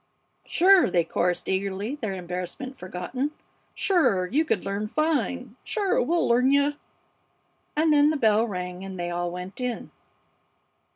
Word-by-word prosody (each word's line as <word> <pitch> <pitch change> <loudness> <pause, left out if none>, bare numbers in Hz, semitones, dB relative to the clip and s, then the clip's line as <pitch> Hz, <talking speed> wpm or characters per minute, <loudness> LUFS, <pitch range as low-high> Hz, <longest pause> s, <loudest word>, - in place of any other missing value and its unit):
"Sure!" 375 - +5
they 175 -1 +2
chorused, 175 +2 -1
eagerly, 195 +4 -2
their 225 -9 -4
embarrassment 180 +9 -5
forgotten. 185 +8 -4 0.5
"Sure, 315 - +2
you 275 - +1
could 315 - -1
learn 200 +2 -2
fine! 260 -4 -1
Sure, 435 +2 0
we'll 340 -4 +1
learn 245 +2 +4
you!" 285 +1 +3 1.0
And 310 0 +3
then 290 0 +5
the 310 - 0
bell 220 -2 +3
rang 180 -2 -5
and 190 -1 -7
they 175 0 -2
all 175 0 -2
went 180 +6 -7
in. 250 -2 -3
225 Hz, 140 wpm, -26 LUFS, 180-290 Hz, 1.0 s, Sure